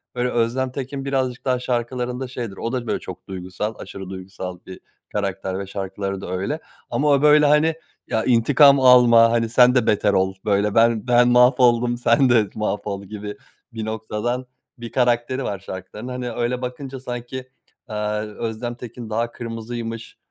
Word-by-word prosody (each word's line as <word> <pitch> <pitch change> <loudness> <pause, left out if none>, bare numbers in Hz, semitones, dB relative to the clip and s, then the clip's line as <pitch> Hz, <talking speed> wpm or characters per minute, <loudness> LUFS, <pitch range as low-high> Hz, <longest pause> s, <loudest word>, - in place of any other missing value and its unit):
öyle 125 0 0
Özlem 125 +2 0
Tekin 135 +1 -5
birazcık 130 -2 -2
daha 125 -1 +1
şarkılarında 125 +1 -2
şeydir. 120 -6 -6
O 115 - -3
da 125 -3 -3
böyle - - -1
çok - - -10
duygusal, 95 +3 -5
aşırı 95 -1 -8
duygusal 95 -1 -7
bir 95 - -10 0.3
karakter 95 -2 -3
ve 100 - -5
şarkıları 95 0 -4
da 90 - -6
öyle. 100 - -2 0.3
Ama 150 - 0
o 140 -1 +4
böyle 150 0 +6
hani 150 +2 +4 0.3
ya 110 - 0
intikam 140 +4 +5
alma 120 -3 +7
hani 115 -1 +1
sen 125 +2 +5
de 125 -3 +2
beter 105 -1 +2
ol 95 0 +2
böyle 105 0 +1
ben, 115 +1 +3
ben 120 0 +5
mahvoldum 125 -1 +4
sen 120 +2 +3
de 110 -4 +3
mahvol 105 -2 -3
gibi 105 +2 -7 0.4
bir 110 -1 -4
noktadan 110 +3 -3 0.3
bir 120 -1 -8
karakteri 125 +1 +1
var 100 -2 -3
şarkıların. 95 +5 -8
Hani 125 -1 -4
öyle 120 +2 -2
bakınca 130 +1 -6
sanki, 125 +1 -6 0.4
aaa, 105 0 -2
Özlem 110 +2 -5
Tekin 120 -1 -9
daha 115 +2 -1
kırmızıymış, 115 -1 -6
120 Hz, 165 wpm, -22 LUFS, 105-125 Hz, 0.4 s, alma